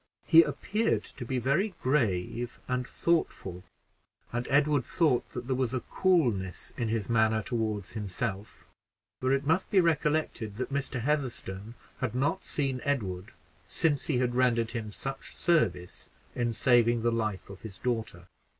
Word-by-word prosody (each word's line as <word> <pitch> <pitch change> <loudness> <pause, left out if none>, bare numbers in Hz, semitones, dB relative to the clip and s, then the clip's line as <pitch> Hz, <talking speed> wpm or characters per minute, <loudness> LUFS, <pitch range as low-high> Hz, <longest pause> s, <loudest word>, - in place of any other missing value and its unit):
He 165 0 +8
appeared 205 +8 0
to 125 - -7
be 130 +2 -1
very 160 - +1
grave 120 -3 0
and 125 0 -1
thoughtful, 95 - -1 0.7
and 120 +1 -2
Edward 145 -1 +3
thought 145 -2 +1
that 125 -1 -5
there 130 0 0
was 130 -1 0
a - - +1
coolness 115 - 0
in 115 - -1
his 110 -3 -1
manner 110 -1 +2
toward 110 -4 -2
himself 105 0 -5 0.5
for 130 +1 +1
it 135 +1 +1
must 165 +5 +1
be 195 - +4
recollected 150 - +1
that 130 +2 -3
Mr. 140 -3 -2
Heatherstone 120 -6 -2 0.2
had 130 -4 -2
not 135 +3 0
seen 135 -4 -1
Edward 100 -10 -2 0.3
since 150 -5 +1
he 145 - +1
had 125 -1 +1
rendered 120 -2 +2
him 110 -3 -4
such 135 +5 -5
service 115 - 0 0.2
in 120 -1 0
saving 120 -1 +3
the 120 - +3
life 110 -4 -2
of 100 - -11
his 105 -4 -9
daughter. 110 -8 -3
125 Hz, 150 wpm, -29 LUFS, 110-140 Hz, 0.7 s, He